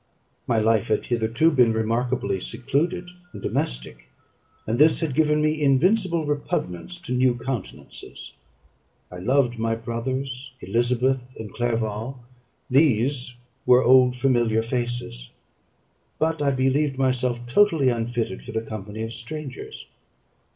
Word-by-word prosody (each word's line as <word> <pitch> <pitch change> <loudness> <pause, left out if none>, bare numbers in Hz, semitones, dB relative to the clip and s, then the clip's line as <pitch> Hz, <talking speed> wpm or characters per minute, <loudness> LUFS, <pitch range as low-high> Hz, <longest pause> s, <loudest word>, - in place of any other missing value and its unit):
My 115 - +2
life 110 +1 +2
had 110 - 0
hitherto 120 +7 +2
been 125 -6 +4
remarkably 115 0 -1
secluded 165 - -2 0.2
and - - -8
domestic; - - -4 0.6
and 115 +3 -1
this 155 +2 +5
had 160 -5 -2
given 150 +1 +2
me 155 0 0
invincible 170 +4 +2
repugnance 145 - -3
to 150 -7 -4
new 125 -1 +3
countenances. 115 - -7 0.8
I 90 - -8
loved 125 +3 +1
my 115 0 0
brothers, 130 +3 -4
Elizabeth, 125 +2 0
and 110 -3 -7
Clerval; 115 +1 -2 0.5
these 125 -2 +2 0.3
were 125 +1 +6
"old 125 0 +5
familiar 120 -4 +2
faces;" 120 - -4 0.9
but 160 0 0
I 145 - +2
believed 135 +1 +1
myself 125 -2 0
totally 155 0 +3
unfitted 115 - -2
for - - -9
the 110 0 -1
company 110 0 -6
of 115 +1 -5
strangers. 135 +3 -8
125 Hz, 125 wpm, -24 LUFS, 115-140 Hz, 0.9 s, were